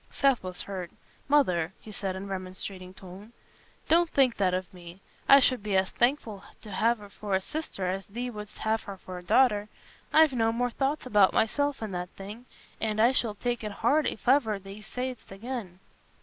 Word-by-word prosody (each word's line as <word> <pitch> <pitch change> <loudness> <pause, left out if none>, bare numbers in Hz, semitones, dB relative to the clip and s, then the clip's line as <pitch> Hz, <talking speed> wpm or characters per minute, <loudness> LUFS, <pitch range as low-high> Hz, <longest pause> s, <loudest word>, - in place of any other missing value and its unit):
Seth 275 -3 +2
was 185 -1 -5
hurt. 185 -3 -5 0.4
"Mother," 185 - +3
he 215 - -11
said, 195 -2 -3
in 190 - -5
a - - -6
remonstrating 185 -1 -6
tone, 190 +4 -12 0.5
"don't 340 +1 +4
think 265 -5 +3
that 190 -2 +2
of 185 +2 -3
me. 175 0 -11 0.3
I 275 - +10
should 255 -3 +2
be 200 -2 0
as 190 0 +1
thankful 240 -5 0 0.2
t' 215 - -10
have 230 +5 +2
her 205 -1 -12
for 205 -2 -2
a - - +3
sister 295 -4 -5
as 190 +1 -2
thee 245 +4 -4
wouldst 210 -2 -8
t' - - -12
have 220 0 +1
her 200 -1 -8
for 185 -1 -8
a - - -13
daughter. 210 +1 +3 0.4
I've 315 -3 +6
no 225 -2 +2
more 245 +1 0
thoughts 275 +4 -1
about 205 -6 +4
myself 285 +3 +1
in 215 - -4
that 180 -1 -4
thing, 210 +6 -9 0.3
and 215 -1 -1
I 235 +3 +6
shall 230 -5 0
take 240 +1 -2
it 210 - -3
hard 305 +1 +4
if - - -5
ever 245 -6 +4
thee 195 +2 -10
say'st 250 +2 -5
it - - -7
again." 210 -5 -6
210 Hz, 205 wpm, -28 LUFS, 190-250 Hz, 0.5 s, I